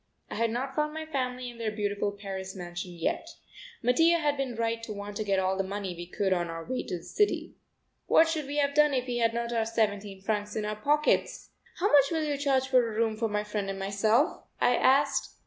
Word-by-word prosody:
I -, -, -3 dB
had 230 Hz, +1 st, +1 dB
not 255 Hz, +4 st, -3 dB
found 300 Hz, +1 st, -1 dB
my 315 Hz, 0 st, -4 dB
family 255 Hz, -4 st, -3 dB
in 235 Hz, -, -15 dB
their 225 Hz, -1 st, -1 dB
beautiful 205 Hz, -1 st, -1 dB
Paris 195 Hz, -1 st, -6 dB
mansion 175 Hz, 0 st, -6 dB
yet. 170 Hz, -1 st, -3 dB, 0.5 s
Mattia 325 Hz, +8 st, +4 dB
had 295 Hz, -3 st, +1 dB
been 270 Hz, -4 st, -3 dB
right 230 Hz, 0 st, -1 dB
to 230 Hz, -, -7 dB
want 205 Hz, 0 st, -6 dB
to 215 Hz, -, -1 dB
get 200 Hz, -2 st, +1 dB
all 190 Hz, 0 st, +1 dB
the 195 Hz, -, 0 dB
money 195 Hz, -1 st, -4 dB
we 175 Hz, 0 st, -7 dB
could 190 Hz, +1 st, 0 dB
on 175 Hz, -1 st, 0 dB
our 165 Hz, 0 st, -6 dB
way 255 Hz, 0 st, -2 dB
to 180 Hz, -, -4 dB
the 170 Hz, -, -13 dB
city. 415 Hz, 0 st, 0 dB, 0.5 s
What 325 Hz, -, +6 dB
should 315 Hz, -3 st, -2 dB
we 290 Hz, +1 st, -4 dB
have 280 Hz, -1 st, +2 dB
done 300 Hz, -1 st, +4 dB
if 250 Hz, -1 st, 0 dB
we 245 Hz, -1 st, -2 dB
had 230 Hz, 0 st, +2 dB
not 235 Hz, 0 st, -2 dB
our 230 Hz, -1 st, +2 dB
seventeen 205 Hz, -3 st, -1 dB
francs 210 Hz, 0 st, -2 dB
in 215 Hz, -, -1 dB
our 210 Hz, 0 st, -2 dB
pockets? 295 Hz, +8 st, +1 dB, 0.3 s
"How 400 Hz, +4 st, +1 dB
much 285 Hz, -2 st, +7 dB
will 320 Hz, -2 st, 0 dB
you 295 Hz, -1 st, 0 dB
charge 270 Hz, -2 st, +2 dB
for 260 Hz, -1 st, +5 dB
a 215 Hz, -, -6 dB
room 225 Hz, -1 st, +1 dB
for 225 Hz, 0 st, -1 dB
my 210 Hz, 0 st, -1 dB
friend 210 Hz, -1 st, -3 dB
and 195 Hz, -, -3 dB
myself?" 215 Hz, -, +1 dB, 0.2 s
I 245 Hz, -, +4 dB
asked. 275 Hz, +2 st, +2 dB
225 Hz, 235 wpm, -29 LUFS, 200-270 Hz, 0.5 s, much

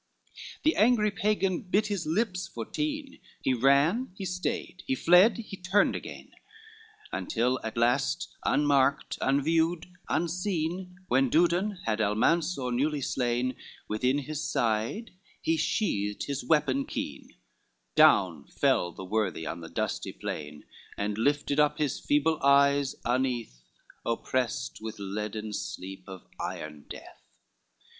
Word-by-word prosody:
XLV -, -, -15 dB
The 315 Hz, -, +3 dB
angry 215 Hz, -1 st, +4 dB
Pagan 200 Hz, -2 st, 0 dB
bit 200 Hz, +3 st, +1 dB
his 200 Hz, -6 st, -2 dB
lips 185 Hz, +2 st, 0 dB
for -, -, -6 dB
teen, 300 Hz, -2 st, -4 dB, 0.2 s
He 130 Hz, -, +2 dB
ran, 140 Hz, -, +3 dB
he 195 Hz, -, -5 dB
stayed, 180 Hz, 0 st, -3 dB
he 130 Hz, -, +1 dB
fled, 180 Hz, -, +6 dB
he 215 Hz, -3 st, -7 dB
turned 190 Hz, +3 st, +2 dB
again, -, -, -8 dB, 0.8 s
Until 125 Hz, +3 st, 0 dB
at 110 Hz, +1 st, -5 dB
last 115 Hz, -, +1 dB
unmarked, 145 Hz, 0 st, +2 dB
unviewed, 160 Hz, +5 st, +2 dB, 0.2 s
unseen, 180 Hz, +1 st, -2 dB
When 135 Hz, -2 st, +3 dB
Dudon 175 Hz, -, +2 dB
had 110 Hz, -1 st, 0 dB
Almansor 125 Hz, -, +1 dB
newly 145 Hz, +4 st, 0 dB
slain, 125 Hz, 0 st, 0 dB, 0.3 s
Within 125 Hz, +6 st, +1 dB
his 150 Hz, +1 st, -4 dB
side 115 Hz, -, -1 dB, 0.3 s
he 165 Hz, -, +1 dB
sheathed 105 Hz, -, -1 dB
his 140 Hz, -2 st, -3 dB
weapon 140 Hz, -1 st, +2 dB
keen, -, -, -6 dB, 0.6 s
Down 85 Hz, -7 st, +4 dB
fell 85 Hz, -, +1 dB
the 95 Hz, -, -9 dB
worthy 95 Hz, -5 st, -1 dB
on 85 Hz, +2 st, -5 dB
the 80 Hz, -, -8 dB
dusty -, -, -3 dB
plain, 75 Hz, 0 st, -6 dB, 0.3 s
And 105 Hz, 0 st, -1 dB
lifted 145 Hz, +5 st, +1 dB
up 150 Hz, 0 st, +3 dB
his 150 Hz, -4 st, -1 dB
feeble 150 Hz, +2 st, +1 dB
eyes 140 Hz, 0 st, +4 dB
uneath, 120 Hz, -, -1 dB, 0.4 s
Opprest 125 Hz, +1 st, -2 dB
with 110 Hz, -1 st, -5 dB
leaden 105 Hz, +2 st, -4 dB
sleep, 95 Hz, -1 st, -6 dB
of 95 Hz, -2 st, -10 dB
iron 75 Hz, -1 st, -5 dB
death. -, -, -10 dB
140 Hz, 130 wpm, -28 LUFS, 110-175 Hz, 0.8 s, fled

